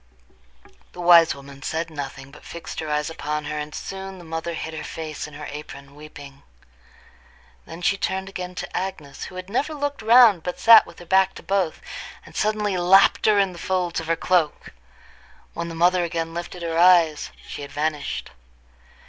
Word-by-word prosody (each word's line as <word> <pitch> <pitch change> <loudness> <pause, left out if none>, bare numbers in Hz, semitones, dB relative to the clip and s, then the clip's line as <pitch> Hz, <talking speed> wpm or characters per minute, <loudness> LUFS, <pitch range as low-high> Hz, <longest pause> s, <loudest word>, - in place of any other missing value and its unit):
The - - -12
wise 170 -2 +6
woman 140 0 -13
said 160 +2 -3
nothing, 135 -2 -7
but 150 - -15
fixed 170 - -8
her 155 - -4
eyes 150 +1 -1
upon 150 -1 -4
her, 150 +1 -3
and 150 0 -6
soon 195 0 -7
the 175 - -12
mother 165 +1 -4
hid 160 0 -5
her 160 - -6
face 155 -1 -6
in 150 - -13
her 150 0 -7
apron 140 -2 -10
weeping. 145 -2 -12 1.3
Then 170 +2 -9
she 195 - +2
turned 190 0 -2
again 180 -2 -6
to - - -6
Agnes, 155 -7 -5
who 185 - -11
had 185 0 -7
never 275 +9 -1
looked 285 -2 -3
round 225 -4 +6
but 180 +2 -5
sat 230 -1 +8
with 170 - -14
her 175 - -12
back 190 +2 +3
to - - -10
both, 190 -4 -1 0.4
and - - -15
suddenly 210 -2 0
lapped 190 +5 +5
her 210 -1 +5
in 195 -2 +3
the 175 - -11
folds 180 -1 -1
of 165 - -7
her 165 - +2
cloak. 165 -2 0 0.8
When 170 0 -4
the 165 - -7
mother 175 +2 +3
again 165 -1 -3
lifted 175 +1 -6
her 165 0 -1
eyes, 170 -4 +5 0.2
she - - -7
had 140 - -8
vanished. 150 0 -3
170 Hz, 190 wpm, -23 LUFS, 150-190 Hz, 1.3 s, sat